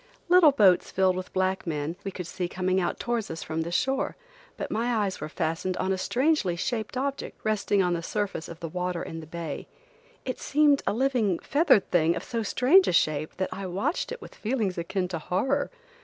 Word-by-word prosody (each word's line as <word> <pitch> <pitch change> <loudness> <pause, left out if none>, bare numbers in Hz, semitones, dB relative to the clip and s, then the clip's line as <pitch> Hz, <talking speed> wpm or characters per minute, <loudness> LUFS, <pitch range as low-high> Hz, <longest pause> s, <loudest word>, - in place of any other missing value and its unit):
Little 350 -4 +7
boats 200 -10 +4
filled 185 -1 +2
with 185 0 -5
black 190 0 0
men, 155 +1 -2
we 195 - -3
could 180 -2 -6
see 175 +1 -3
coming 185 +1 0
out 175 - -2
towards 235 -3 -2
us 160 - -5
from 160 +1 -3
the 170 +1 -4
shore, 265 +9 0 0.4
but - - -4
my 235 +2 0
eyes 190 -5 -4
were 155 - -4
fastened 165 +4 -2
on 190 - 0
a - - -1
strangely 255 - +1
shaped 225 +5 -3
object, 275 +1 -3
resting 205 -2 +2
on 180 -1 +1
the 170 - -1
surface 200 -2 -3
of 165 0 -10
the 165 - -3
water 180 +1 -3
in 165 - -6
the 155 - -10
bay. 165 -2 -5 0.6
It 255 - -3
seemed 290 -1 +3
a - - +2
living, 235 -6 +1
feathered 285 - +3
thing 170 -1 +3
of 170 - -4
so 230 -1 -3
strange 265 - +4
a - - +1
shape 155 -2 +1
that 190 - -1
I 195 -1 -5
watched 195 - -1
it 485 - -6
with - - -11
feelings 215 -5 -1
akin 180 +2 -2
to 170 -3 -3
horror. 260 - 0
190 Hz, 210 wpm, -27 LUFS, 170-245 Hz, 0.6 s, Little